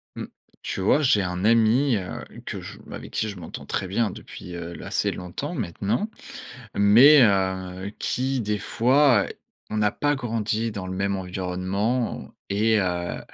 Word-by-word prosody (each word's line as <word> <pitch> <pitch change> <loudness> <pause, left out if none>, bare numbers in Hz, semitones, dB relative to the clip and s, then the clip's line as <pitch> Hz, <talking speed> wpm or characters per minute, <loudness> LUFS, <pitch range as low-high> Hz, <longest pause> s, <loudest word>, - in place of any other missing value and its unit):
Mmh. - - -5 0.4
Tu - - -4
vois, 120 +10 +3
j'ai 120 -8 +4
un 90 +1 -2
ami, 115 +4 +4
heu, 90 -2 -6 0.2
que - - -5
je - - -9
avec - - -8
qui 110 - -1
je 100 - -6
m'entends 85 -3 -8
très 95 - -2
bien 105 +4 +1
depuis, 90 -1 -9
heu, 85 0 -6
l - - -9
assez - - 0
longtemps, 90 -1 -5
maintenant. 100 - -2 0.7
Mais, 120 +9 +8
heu, 95 -2 0
qui 130 +1 -1
des 105 -1 -1
fois, 125 0 +3
heu, - - -8 0.4
on 110 - -1
a 105 -1 +3
pas 145 +5 0
grandi 115 -2 -2
dans 100 -3 -6
le 95 - -4
même 100 +1 0
environnement 95 +6 -2 0.2
et 110 +2 +3
heu 90 -2 -2
100 Hz, 165 wpm, -24 LUFS, 95-115 Hz, 0.7 s, Mais